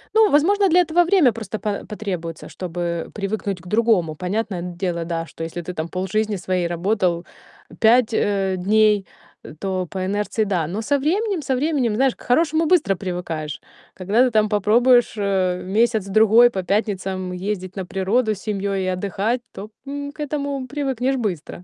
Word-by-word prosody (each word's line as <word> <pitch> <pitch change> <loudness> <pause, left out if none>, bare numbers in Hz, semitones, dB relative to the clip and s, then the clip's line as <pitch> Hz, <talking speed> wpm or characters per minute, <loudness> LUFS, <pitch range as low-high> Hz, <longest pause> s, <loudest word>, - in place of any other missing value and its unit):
Ну, 440 -1 +5
возможно, 385 +7 +4
для 355 +2 +5
этого 345 +1 +3
время 340 -8 +4
просто 215 -1 -6
па 210 -2 -3
потребуется, 180 -7 -5
чтобы 170 -2 -4
привыкнуть 200 -2 -3
к 180 - -14
другому. 210 -7 +2
Понятное 190 +1 -3
дело, 175 -1 -3
да, 165 -1 -3
что 165 - -8
если 165 +1 -5
ты 180 +2 -6
там 160 -1 -3
полжизни 195 +5 -1
своей 180 -1 -1
работал 175 0 0 0.5
5, 230 +1 +4
э, 195 -3 +1
дней, 210 +1 +3 0.5
то 190 -2 -2
по 190 -1 -3
инерции- 205 +3 -1
да. 180 -6 -1
Но 195 +7 -3
со 285 +6 +1
временем, 380 +5 0
со 265 -2 -1
временем, 265 -5 0
знаешь, 265 +2 +2
к - - -21
хорошему 315 +5 +2
быстро 305 - +3
привыкаешь. 175 -5 -5 0.3
Когда 200 +6 +2
ты 255 - 0
там 215 -1 +2
попробуешь, 235 +4 +4
э, 190 -3 0
месяц-другой 220 +2 +4
по 190 -5 -4
пятницам 190 -2 -1
ездить 185 0 -4
на 190 -2 -4
природу 205 +6 0
с - - -13
семьёй 200 -2 -2
и - - -2
отдыхать, 200 +6 -1
то, 205 +2 -8 0.2
м, 285 +1 -5
к 300 - -25
этому 285 -3 -3
привыкнешь 270 -1 -1
быстро. 180 - -4
205 Hz, 165 wpm, -21 LUFS, 185-245 Hz, 0.5 s, Ну